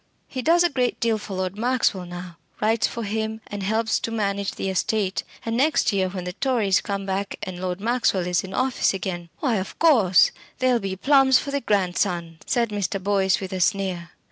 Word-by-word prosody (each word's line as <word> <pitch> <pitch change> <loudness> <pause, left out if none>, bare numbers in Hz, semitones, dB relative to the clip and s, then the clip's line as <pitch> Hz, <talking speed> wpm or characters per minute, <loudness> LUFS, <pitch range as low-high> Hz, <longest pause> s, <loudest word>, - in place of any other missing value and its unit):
He 260 - -4
does 340 +6 +4
a 350 - +3
great 250 -3 0
deal 225 -2 +1
for 200 -2 -7
Lord 185 0 -2
Maxwell 230 -6 +1
now: 175 -1 -8 0.2
writes 220 +1 +2
for 230 - -5
him, 220 +1 -2
and 205 -1 -6
helps 220 +3 +1
to - - -3
manage 200 -3 -1
the - - -4
estate; 195 +1 0 0.2
and 225 0 -1
next 275 -3 +2
year, 190 -1 +1
when 185 -1 -5
the 180 0 -5
Tories 220 -5 +1
come 200 -1 -3
back 195 +1 -2
and 185 -1 -6
Lord 180 0 -2
Maxwell 220 -4 +1
is 180 -1 +1
in 190 - -8
office 255 -6 +1
again 175 -3 -4
" - - -38
"Why, 250 -7 +1
of 190 0 -5
course, 225 - +5 0.3
there'll 255 -2 +2
be 195 -2 -3
plums 270 +4 +5
for 280 - -3
the 280 0 -1
grandson," 180 -5 0
said 235 -2 +1
Mr. 205 -2 -2
Boyce 190 -1 +2
with 190 -1 -6
a 185 - -2
sneer. 185 -3 0
200 Hz, 205 wpm, -24 LUFS, 185-235 Hz, 0.3 s, course